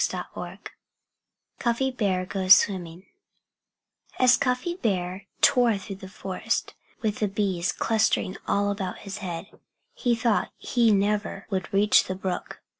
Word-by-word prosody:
XVII - - -4 1.0
CUFFY 245 +3 0
BEAR 195 -7 0
GOES 190 0 +6
SWIMMING 180 -2 -2 1.1
As 255 0 +6
Cuffy 250 +6 0
Bear 190 - -2
tore 245 -6 +4
through 195 0 -8
the 190 -1 -10
forest, 190 -1 -3 0.3
with 210 -2 -1
the 210 - +1
bees 190 -3 -1
clustering 220 -4 +1
all 205 0 +1
about 195 -2 -4
his 195 - -6
head, 185 +1 -7 0.3
he 245 - +1
thought 230 -2 +1
he 235 -2 +2
never 205 0 0
would 190 -1 -2
reach 205 +2 +4
the 185 - -4
brook. 185 -1 -5
200 Hz, 130 wpm, -26 LUFS, 190-230 Hz, 1.1 s, GOES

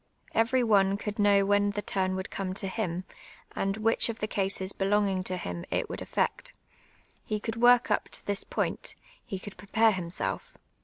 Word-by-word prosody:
Kver}' 245 +3 +3
one 200 -3 +4
could 210 +1 -5
know 200 -1 +5
when 205 0 +3
the 205 0 -3
turn 185 -1 0
would 190 0 -5
come 190 -1 -3
to 195 - -1
him, 185 -3 -2 0.5
and 195 +1 -1
which 225 +2 +2
of 225 - -3
the 215 - -1
cases 195 -2 0
helonj^ing 195 -1 +1
to 185 0 -2
him 90 - -5
it - - -1
would - - -5
allect; - - -1 0.7
he 215 - -2
could 225 +1 -4
work 245 +1 +6
uj) - - +1
to - - -5
this 205 -1 0
])()iut, - - -2
— - - -27
he 195 - -3
co\ild 195 +1 -10
])rc|)are 220 +4 +3
himself. 185 - -3
200 Hz, 190 wpm, -29 LUFS, 190-220 Hz, 0.7 s, work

